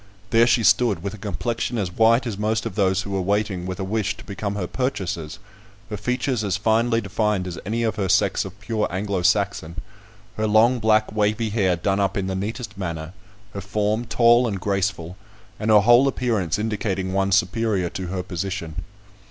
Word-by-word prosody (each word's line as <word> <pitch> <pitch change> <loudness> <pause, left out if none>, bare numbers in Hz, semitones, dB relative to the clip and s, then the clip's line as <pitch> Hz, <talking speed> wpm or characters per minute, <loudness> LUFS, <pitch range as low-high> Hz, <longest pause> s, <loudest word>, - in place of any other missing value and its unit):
There 115 0 +5
she 120 -1 +3
stood, 105 -7 +3
with 100 0 -4
a - - -8
complexion 115 +4 -3
as 95 -5 -2
white 115 +3 +4
as 115 -4 -3
most 110 +1 -1
of - - -4
those 95 -1 +1
who 100 - -7
were 95 -1 0
waiting 100 -1 -1
with 95 +1 -5
a - - -2
wish 105 +1 -1
to 110 - -11
become 100 0 -4
her 100 -3 -2
purchasers; 95 - -3 0.5
her - - -2
features 125 +2 -1
as 100 -3 0
finely 115 +2 +2
defined 105 -1 -1
as 85 -2 -6
any 115 +2 -1
of 110 -2 -1
her 95 -3 -1
sex 95 0 +2
of 95 +1 -10
pure 110 -2 -1
Anglo 95 +1 -2
Saxon; 85 -1 0 0.6
her 110 0 0
long 115 +4 +4
black 110 -1 +2
wavy 110 +1 0
hair 95 -5 +2
done 95 +4 -1
up 100 0 0
in 100 - -1
the 95 - -2
neatest 110 +3 -5
manner; 85 -2 -5 0.4
her 100 - -5
form 105 +4 -1
tall 120 +1 +4
and 100 -4 -3
graceful, 95 -2 -2 0.4
and 110 +1 -2
her 105 -1 +7
whole 120 +5 +6
appearance 115 - 0
indicating 100 -3 -2
one 100 0 +1
superior 95 -1 +1
to 95 -1 -5
her 90 0 -3
position. 90 -3 -5
105 Hz, 195 wpm, -23 LUFS, 95-110 Hz, 0.6 s, her